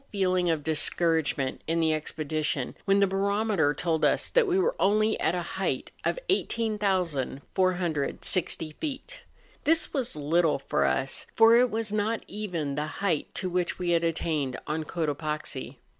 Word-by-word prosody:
feeling 185 -3 +1
of 160 -3 0
discouragement 160 -3 +1
in 165 +1 +1
the 160 -1 +3
expedition 155 -3 -2
when 195 0 +4
the 200 - +5
barometer 200 -4 +1
told 160 +2 -1
us - - +2
that - - +3
we 365 0 +2
were 445 +6 +2
only 215 +2 +3
at 170 - +1
a 175 - -2
height - - -3
of - - 0
18,460 185 - 0
feet. 315 - -5 0.4
This 325 +2 +2
was 265 - -1
little 155 +2 +2
for 135 - 0
us, 70 - -1
for 225 +1 +7
it 250 +1 +5
was 220 -1 -2
not 215 +2 0
even 180 -9 -3
the 150 +2 -2 0.2
height 165 -6 +1
to 185 - -1
which 180 -1 -1
we 180 -1 -1
had 170 -1 +2
attained 155 -5 -1
on 155 +1 -2
Cotopaxi. 150 -4 -3
175 Hz, 150 wpm, -27 LUFS, 155-210 Hz, 0.4 s, for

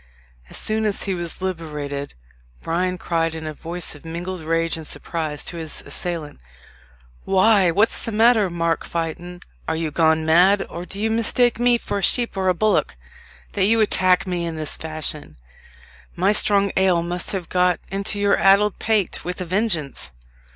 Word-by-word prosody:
As - - -5
soon 220 0 +1
as 205 -2 -1
he 195 - -1
was 175 +1 -6
liberated, 150 -6 -5 0.5
Bryan 180 +2 -1
cried 165 -2 -1
in 160 -1 -6
a 155 - -4
voice 170 +3 -4
of 145 - -14
mingled 175 +2 -5
rage 165 +1 0
and 160 -2 -7
surprise 150 0 -4
to 170 - -3
his 160 -2 -5
assailant, 165 -5 -3 0.8
"Why, 195 -1 +4
what's 205 +7 +2
the 230 - -4
matter, 220 -2 +4
Mark 170 -1 -1
Fytton? 170 +2 -5 0.3
are 160 - 0
you 160 -1 -2
gone 160 +1 +2
mad, 180 +5 +4
or 175 +1 -6
do 195 - -5
you 220 +1 0
mistake 230 +1 +2
me 240 0 +4
for 205 - -4
a - - -5
sheep 235 +5 +1
or 190 -1 -1
a 185 - +3
bullock, 210 - +1 0.6
that - - +2
you 225 +3 +3
attack 185 -4 +3
me 180 -2 -2
in 165 -1 -3
this 155 -1 -4
fashion? 155 - -4 0.8
My - - +2
strong 200 -2 +4
ale 185 -3 +3
must 175 +1 -2
have 185 -4 -4
got 180 -1 +2
into 200 +2 0
your 200 0 +2
addle 200 +2 +5
pate 215 -1 -1
with 180 +2 -5
a 185 - -3
vengeance. 175 - -1
180 Hz, 175 wpm, -21 LUFS, 165-200 Hz, 0.8 s, addle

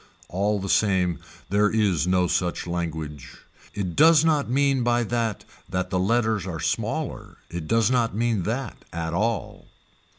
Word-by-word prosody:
All 100 +3 0
the 100 - -4
same 95 -4 +2 0.3
there 105 +1 +3
is 100 -7 +1
no 90 0 +3
such 90 0 -1
language, 80 -5 -5 0.4
it 95 -5 -3
does 160 0 +6
not 150 -6 +2
mean 135 0 +2
by 120 0 +2
that 110 -3 -2 0.2
that 95 +1 -2
the 90 - +1
letters 110 -1 +1
are 85 -3 -4
smaller - - -3
it 85 -2 -5
does 115 +2 +3
not 120 -4 +1
mean 115 -2 +1
that 115 +6 -4
at 80 0 -3
all. 110 +4 -2
105 Hz, 155 wpm, -25 LUFS, 90-115 Hz, 0.4 s, does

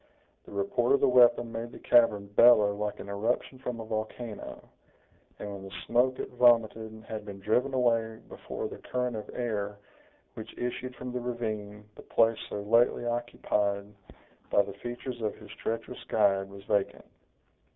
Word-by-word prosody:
The - - -13
report 100 +5 +1
of 140 - +4
the - - +4
weapon 120 -2 +5
made 115 +1 -5
the - - -10
cavern 115 -4 +4
bellow 105 0 +6
like 105 0 -3
an - - -8
eruption 115 +6 -2
from 125 -3 -4
a 115 - -6
volcano; 110 0 -5 0.7
and 105 - -6
when 100 - -7
the 95 0 -9
smoke 130 +2 +2
it - - -5
vomited 110 -3 +3
had 110 -1 -5
been 100 -1 -8
driven 125 +7 +1
away 115 -3 +1
before - - -6
the - - -9
current 125 -1 -2
of 105 - -6
air 105 -4 -3 0.6
which - - -9
issued 125 +1 -4
from 125 0 -6
the 125 - -2
ravine 110 -4 -4
the - - -12
place 115 0 +2
so 100 - -4
lately 115 +3 +3
occupied 105 -4 -1 0.6
by 100 - +4
the 100 - -8
features 120 +3 -6
of 110 -1 -1
his - - -13
treacherous 115 0 -5
guide 95 -1 +2
was 100 0 -11
vacant. 100 -1 -1
115 Hz, 165 wpm, -29 LUFS, 105-120 Hz, 0.7 s, bellow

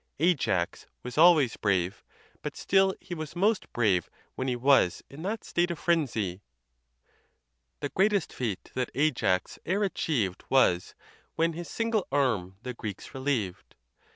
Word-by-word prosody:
Ajax 140 - +1 0.2
was 125 - -6
always 155 -6 +6
brave; 95 -3 0 0.4
but - - -5
still 190 0 +3
he - - -8
was 155 -2 -6
most 205 +4 +1
brave 100 -7 +1 0.2
when 130 - -3
he 125 - 0
was 125 -7 +3
in 140 +3 -9
that 205 +5 -3
state 175 +1 0
of 170 - -3
frenzy: 120 - 0 1.4
The - - -2
greatest 200 +1 +1
feat 110 -7 -4
that 125 -1 -1
Ajax 125 -11 +1
e'er 200 +4 +1
achieved 120 - -1
Was, 90 -10 +3 0.4
when 165 +1 +1
his 170 +1 -7
single 225 -3 -1
arm 110 -10 0
the 125 -1 -4
Greeks 105 -5 -7
relieved. 130 -9 -2
135 Hz, 140 wpm, -28 LUFS, 105-175 Hz, 1.4 s, always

